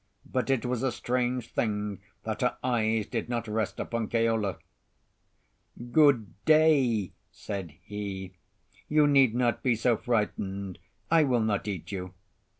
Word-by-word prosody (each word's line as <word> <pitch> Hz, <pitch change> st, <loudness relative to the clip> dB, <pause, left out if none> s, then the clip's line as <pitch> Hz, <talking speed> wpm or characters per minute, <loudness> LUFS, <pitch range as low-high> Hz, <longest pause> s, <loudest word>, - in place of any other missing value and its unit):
But 130 Hz, +1 st, -2 dB
it 130 Hz, -4 st, +1 dB
was 125 Hz, -1 st, -1 dB
a 135 Hz, -1 st, +1 dB
strange 125 Hz, 0 st, -2 dB
thing 105 Hz, -3 st, -1 dB, 0.2 s
that -, -, -3 dB
her -, -, +1 dB
eyes 110 Hz, -3 st, +1 dB
did 115 Hz, +2 st, -4 dB
not 120 Hz, -2 st, -2 dB
rest 110 Hz, -1 st, -2 dB
upon 115 Hz, -2 st, -2 dB
Keola. 115 Hz, -4 st, +1 dB, 1.3 s
"Good 120 Hz, -, +3 dB
day," 140 Hz, -, +4 dB, 0.2 s
said 95 Hz, -7 st, -6 dB
he. 100 Hz, -2 st, -6 dB, 0.6 s
"You 150 Hz, 0 st, +5 dB
need 135 Hz, -5 st, +5 dB
not 120 Hz, -1 st, +1 dB
be 125 Hz, -3 st, +2 dB
so 115 Hz, +1 st, +2 dB
frightened; 100 Hz, -5 st, -2 dB, 0.3 s
I 165 Hz, -1 st, +6 dB
will 125 Hz, -5 st, +2 dB
not 105 Hz, -2 st, -1 dB
eat 95 Hz, -4 st, -4 dB
you." 90 Hz, -2 st, -5 dB
115 Hz, 140 wpm, -28 LUFS, 105-125 Hz, 1.3 s, I